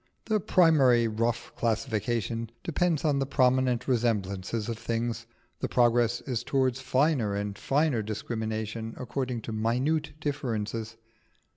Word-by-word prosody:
The 215 -1 +1
primary 140 - +4
rough 115 +2 -1
classification 115 0 -1
depends 170 -1 0
on 145 -3 +2
the 135 - -1
prominent 130 -2 +2
resemblances 110 -4 0
of 115 -2 -4
things: 115 +1 -2 0.3
the - - -1
progress 120 -1 +3
is 120 -3 -3
towards 130 -1 +1
finer 130 -6 +1
and 100 0 -3
finer 140 -2 +1
discrimination 110 +1 -4
according 125 -1 -3
to 110 - -6
minute 130 +8 0
differences. 115 -6 -3
120 Hz, 120 wpm, -28 LUFS, 110-135 Hz, 0.3 s, primary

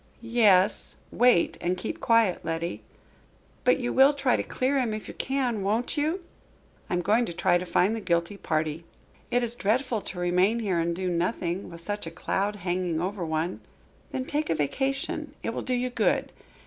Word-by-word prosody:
"Yes 210 -5 +3 0.2
wait 245 -7 +3
and 180 +1 0
keep 180 - -5
quiet, 230 -6 +3
Letty." 165 +1 -3 0.8
"But 250 - +4
you 245 -2 -2
will 270 +2 +6
try 270 -3 +2
to - - 0
clear 270 +2 0
him, 230 -4 0
if 215 - -7
you - - -7
can, 255 -5 -1
won't 220 +8 0
you?" 320 +5 -1 0.6
"I - - 0
am 175 - -1
going 220 +6 +3
to 175 - -5
try 175 +1 +2
to 180 - -6
find 200 +6 +2
the - - -3
guilty 170 0 0
party." 155 -3 -2 0.5
"It 245 0 +1
is 235 -1 -2
dreadful 240 +1 0
to 185 - -6
remain 180 +5 +2
here 190 -6 0
and 170 0 0
do 185 +1 -3
nothing, 175 +1 -1
with 170 0 -10
such 205 +1 -4
a - - -3
cloud 195 +4 -2
hanging 180 -3 -1
over 185 +2 -2
one." 160 +2 -2 0.5
"Then 260 -1 -3
take 300 +2 -2
a 165 - +2
vacation. 275 - -1
It 230 - -2
will - - -3
do 255 - -1
you 250 0 -1
good. - - +1
205 Hz, 190 wpm, -27 LUFS, 175-245 Hz, 0.8 s, will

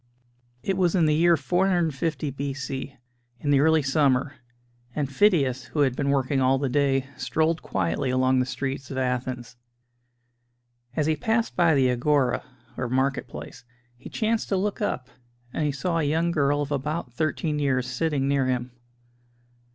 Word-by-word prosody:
It 190 -1 -1
was 180 -2 +2
in 170 -3 +4
the 155 - +3
year 170 +2 +4
450 165 -6 0
B.C., 135 0 -5 0.4
in 145 - -1
the 140 - +5
early 160 +1 +4
summer, 135 -1 +2 0.6
and 145 -2 0
Phidias, 135 -5 +2
who 150 - -2
had 130 -3 +2
been 140 0 -1
working 135 0 +1
all 130 +1 +3
the 135 0 -1
day, 135 -1 +2
strolled 160 +1 0
quietly 95 +7 -1
along 130 0 +2
the 125 - 0
streets 135 0 -4
of 135 - -5
Athens. 125 -1 -3 1.4
As 155 - +1
he 155 0 +2
passed 225 +9 0
by 170 -3 +4
the 130 -2 +3
Agora 130 +1 +1 0.3
(or 125 -2 -2
market 130 +2 0
place), - - -9 0.3
he 120 - -11
chanced 225 0 -1
to 195 - +1
look 205 +3 -2
up, 130 -11 -2 0.5
and 155 - -1
he - - +1
saw 165 +5 -1
a - - +1
young 160 +4 +1
girl 145 -2 +1
of 145 - -7
about 145 -1 -3
thirteen 155 +2 -1
years 130 -3 +1
sitting 135 +2 -1
near 140 -2 +2
him. 125 -1 -1
140 Hz, 165 wpm, -25 LUFS, 130-160 Hz, 1.4 s, the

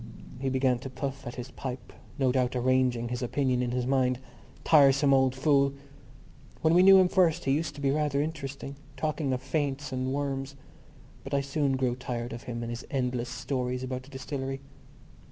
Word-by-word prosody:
He 135 0 -1
began 130 -1 +2
to 135 - -7
puff 135 +1 -5
at 120 - -6
his 125 +1 -7
pipe, 130 -1 -7 0.2
no 135 -3 +2
doubt 125 -1 +1
arranging 125 -1 +1
his 125 +1 -3
opinion 130 0 0
in 125 - -1
his 125 0 -1
mind. 130 -1 +2 0.5
Tiresome 140 -2 +5
old 130 -1 +3
fool! 140 0 +3 0.9
When 160 - +4
we 175 - +6
knew 195 +1 +9
him 185 -1 +6
first 180 -3 +2
he 135 - +2
used 150 +1 0
to 145 - -8
be 135 -1 +2
rather 150 -1 +1
interesting, 140 -2 -4 0.2
talking 155 0 -1
of 130 0 -2
faints 140 0 -2
and 130 0 -2
worms; 135 -1 -3 0.7
but 135 +1 -3
I 140 - +2
soon 140 -1 0
grew 125 -2 0
tired 120 -2 -4
of 115 - -7
him 120 -1 -4
and 115 - -4
his 120 +1 -5
endless 125 -2 -1
stories 125 0 -3
about 130 0 -4
the 130 - -16
distillery. 135 0 -4
135 Hz, 190 wpm, -28 LUFS, 125-140 Hz, 0.9 s, knew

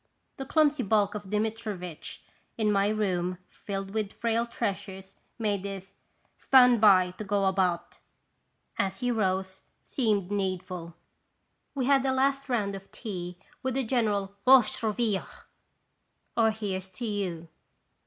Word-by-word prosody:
The 270 -2 -6
clumsy 300 -2 +3
bulk 205 -2 +2
of 205 -2 -7
Dmitrivitch, 210 -5 -3 0.3
in 215 -2 +2
my 200 0 +3
room 185 -4 0
filled 195 -1 -5
with 215 -1 -2
frail 230 0 0
treasures, 195 -4 -4 0.2
made 205 -4 -1
his 195 -1 -7 0.2
" - - -40
Stand 250 -4 +6
by 185 -4 +6
to - - -3
go 200 -1 +1
about! 185 -2 0 0.4
" - - -40
as 195 -1 -1
he 245 0 +1
rose, 190 -3 -1 0.2
seem 210 -7 0
needful. 185 -4 -3 0.8
We 265 -3 0
had 275 0 +4
a 265 -1 +1
last 275 +1 +1
round 205 -5 0
of 195 0 -11
tea 180 -6 -6 0.2
with 260 -1 -1
a 270 - +1
general 210 -5 0
"Vosh 255 -3 +6
durrivia!" 215 -2 0 1.1
(Here 215 -4 +1
's 190 - -12
to 190 +6 -6
you 185 -6 -3
205 Hz, 140 wpm, -28 LUFS, 190-230 Hz, 1.1 s, Stand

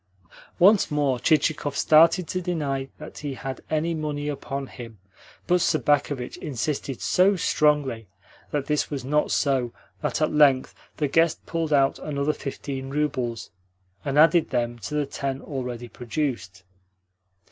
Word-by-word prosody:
Once 195 +3 +5
more 145 -4 +1
Chichikov 150 -1 +1
started 165 +3 +5
to 185 - -2
deny 145 -7 -2
that 150 - -10
he 145 -2 -4
had 135 0 -6
any 160 +2 0
money 150 -2 -3
upon 140 -1 -4
him, 115 -4 -10 0.5
but 180 0 +2
Sobakevitch 145 -5 +1
insisted 140 -1 -3
so 195 +2 +3
strongly 150 - +1 0.4
that 145 -2 -2
this 150 0 0
was 140 -4 -4
not 150 +2 +1
so 130 -4 +1 0.3
that - - -1
at - - +1
length 140 -4 +4 0.2
the 150 - +1
guest 165 +3 +2
pulled 165 -2 -2
out 135 -2 +3
another 145 0 -1
fifteen 135 -2 -6
roubles, 130 -6 -2 0.5
and 140 0 -2
added 165 +2 +5
them 120 -1 -1
to 150 - -5
the 150 -1 +1
ten 135 -1 -4
already 125 -4 -5
produced. 120 -6 -4
145 Hz, 140 wpm, -25 LUFS, 130-155 Hz, 0.5 s, Once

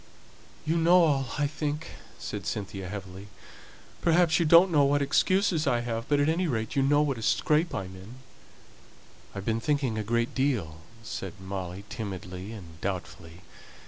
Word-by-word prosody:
"You 160 +2 +1
know 175 +2 +5
all, 140 -4 +2
I 145 - +2
think," 150 +1 -3 0.3
said 100 -4 -6
Cynthia, 95 -2 -4
heavily. 95 0 -8 0.7
"Perhaps 170 0 +3
you 170 - +2
don't 170 +3 +7
know 150 -3 +5
what 145 +1 +3
excuses 165 +3 +2
I 120 -3 +2
have, 115 -1 -4
but 145 -1 +3
at 145 - +3
any 170 +3 +1
rate 110 -6 -2
you 140 - +3
know 145 +2 +4
what 135 -5 -1
a - - -7
scrape 155 +8 +1
I - - -2
am 95 0 -10
in." 95 +6 -11 1.2
"I've 100 0 -5
been 115 0 0
thinking 135 -6 0
a - - -2
great 115 +2 0
deal," 120 - 0 0.3
said 95 -4 -5
Molly, 95 0 -6
timidly 100 -3 -6
and 85 -7 -11
doubtfully. 90 -3 -5
120 Hz, 170 wpm, -28 LUFS, 95-150 Hz, 1.2 s, don't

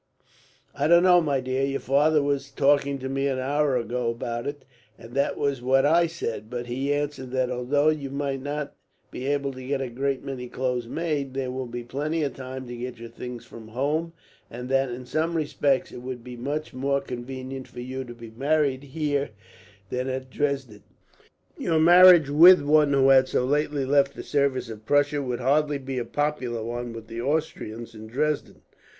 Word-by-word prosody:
"I 145 - 0
don't 170 +2 +6
know, 180 -1 +6
my 145 -4 0
dear. 130 +1 -1
Your 135 0 0
father 150 +2 +3
was 140 -1 -1
talking 140 0 +2
to 130 0 -5
me 135 +1 -1
an 135 -2 -1
hour 140 +1 +1
ago 120 +1 -2
about 115 +1 -4
it, 145 -2 -6 0.3
and 115 +1 -13
that 140 +1 0
was 140 -3 -1
what 135 +2 +3
I 170 +3 +4
said; 115 -10 -5
but 120 0 -4
he 130 +4 -2
answered 145 -2 -2
that, 130 -1 0
although 140 +5 +2
you 150 -3 -2
might 140 -1 -3
not 145 +1 -4 0.4
be 130 - -5
able 140 -1 0
to 130 0 -9
get 135 +1 -1
a 130 -2 -4
great 135 +2 -2
many 130 -3 -5
clothes 125 -2 -2
made, 145 -3 -2
there 130 -2 -2
will 130 0 -4
be 120 0 -6
plenty 150 +6 -2
of 140 - -2
time 130 0 -7
to 120 0 -7
get 125 0 -6
your 115 0 -9
things 120 0 -8
from 115 -1 -12
home; 150 +8 -1 0.4
and 125 +2 -7
that, 135 0 +2
in 125 +1 -6
some 160 +6 -1
respects, 145 -3 0
it 120 - -9
would 125 -1 -6
be 125 0 -8
much 145 +5 -4
more 140 +2 0
convenient 130 0 -7
for 120 - -9
you 130 +1 -5
to 120 -2 -10
be 115 -1 -11
married 140 +2 +1
here 145 -1 -2 0.6
than 125 +1 -2
at 130 0 -4
Dresden. 135 -8 -2 0.8
Your 165 - +1
marriage, 175 -1 +8
with 165 +4 +8
one 150 0 +4
who 135 -1 +4
had 130 -1 +6
so 125 - 0
lately 145 0 0
left 140 0 +2
the - - -7
service 140 -4 0
of 110 -1 -10
Prussia, 145 0 +2
would 125 -2 -3
hardly 145 +3 +2
be 135 -1 -4
a 120 - -3
popular 130 -6 -2
one 120 +1 -4
with 115 -1 -8
the 115 +1 -6
Austrians 120 -5 -3
in 110 0 -10
Dresden. 150 +6 -2
135 Hz, 195 wpm, -25 LUFS, 125-145 Hz, 0.8 s, marriage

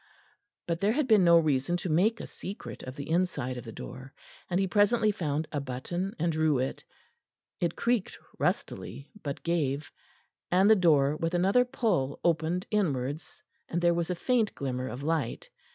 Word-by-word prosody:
But 170 +1 -2
there 205 +2 +3
had 290 0 0
been 215 -5 +6
no 170 -1 +7
reason 155 +1 +2
to 175 - -4
make 190 +8 +2
a - - -5
secret 195 +2 -8
of 130 0 -8
the 140 - -6
inside 165 -7 0
of 125 - -6
the 115 - -7
door, 130 +4 -9 0.3
and 180 0 +1
he 195 - +2
presently 210 +3 +3
found 155 -6 -2
a 145 - -1
button 175 +9 -4
and 170 +1 +1
drew 155 -2 +2
it; 130 +1 -2 0.8
it 170 -1 0
creaked 235 -4 0 0.2
rustily, 140 - -2
but 140 -2 -5
gave, 150 -4 -1 0.6
and 185 +3 +4
the - - +8
door 150 -6 +4
with 165 +2 -1
another 195 +8 +4
pull 205 - 0
opened 170 +2 +1
inwards, 150 -7 -2 0.3
and 170 - -1
there 175 0 +3
was 170 0 -1
a 180 - 0
faint 230 +3 +1
glimmer 130 -2 -3
of 125 +5 -6
light. 155 -6 -2
170 Hz, 175 wpm, -29 LUFS, 140-190 Hz, 0.8 s, the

